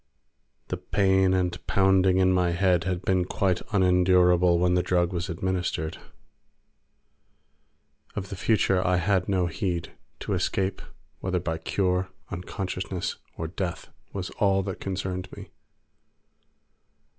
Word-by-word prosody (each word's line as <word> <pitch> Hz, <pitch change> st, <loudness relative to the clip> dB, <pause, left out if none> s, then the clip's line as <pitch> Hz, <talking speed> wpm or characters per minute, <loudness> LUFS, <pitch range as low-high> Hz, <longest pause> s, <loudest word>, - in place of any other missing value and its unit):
The -, -, -2 dB
pain 95 Hz, -1 st, +2 dB
and 90 Hz, -1 st, -1 dB
pounding 95 Hz, -1 st, +3 dB
in 95 Hz, 0 st, +4 dB
my 90 Hz, -1 st, +2 dB
head 90 Hz, -1 st, +2 dB
had 90 Hz, -1 st, -2 dB
been 95 Hz, -1 st, +2 dB
quite 90 Hz, 0 st, 0 dB
unendurable 90 Hz, -2 st, +4 dB
when 90 Hz, +1 st, +2 dB
the 90 Hz, -, +3 dB
drug 90 Hz, 0 st, +1 dB
was 85 Hz, -1 st, -3 dB
administered. 85 Hz, -2 st, -2 dB, 2.2 s
Of 100 Hz, -2 st, -4 dB
the -, -, -5 dB
future 95 Hz, -2 st, +2 dB
I 90 Hz, +1 st, +2 dB
had 95 Hz, +1 st, +1 dB
no 95 Hz, -2 st, +2 dB
heed; 85 Hz, +1 st, -3 dB, 0.3 s
to -, -, -2 dB
escape, 95 Hz, 0 st, -1 dB, 0.4 s
whether 95 Hz, -1 st, -1 dB
by 80 Hz, -2 st, -3 dB
cure, 90 Hz, +2 st, 0 dB, 0.2 s
unconsciousness, 90 Hz, 0 st, -4 dB, 0.2 s
or 80 Hz, -, -3 dB
death, 90 Hz, +1 st, -4 dB, 0.2 s
was 95 Hz, -2 st, -5 dB
all 95 Hz, -1 st, +3 dB
that 95 Hz, -1 st, -5 dB
concerned 95 Hz, -1 st, -4 dB
me. -, -, -10 dB
90 Hz, 125 wpm, -26 LUFS, 90-95 Hz, 2.2 s, in